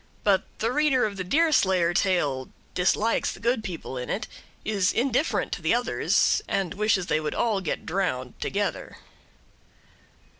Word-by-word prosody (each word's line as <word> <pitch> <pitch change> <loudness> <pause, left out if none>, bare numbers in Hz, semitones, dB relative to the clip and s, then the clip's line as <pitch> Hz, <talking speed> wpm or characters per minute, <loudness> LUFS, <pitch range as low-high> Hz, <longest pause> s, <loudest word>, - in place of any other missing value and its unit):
But 200 -2 +3
the 225 +2 0
reader 275 -3 +3
of 205 -2 -3
the 190 - -3
Deerslayer 190 - +3
tale 145 -9 +1 0.2
dislikes 205 +5 +1
the - - -10
good 235 -1 0
people 165 -9 -5
in 125 - -6
it, 210 - -2 0.4
is 200 -4 +1
indifferent 260 +5 0
to - - -4
the - - +2
others, - - +2
and 195 -2 -1
wishes 205 -2 +1
they 155 - +1
would 155 -1 -3
all 215 -5 +1
get 175 - -3
drowned 160 -9 -2
together. 205 0 -2
195 Hz, 150 wpm, -26 LUFS, 175-225 Hz, 0.4 s, But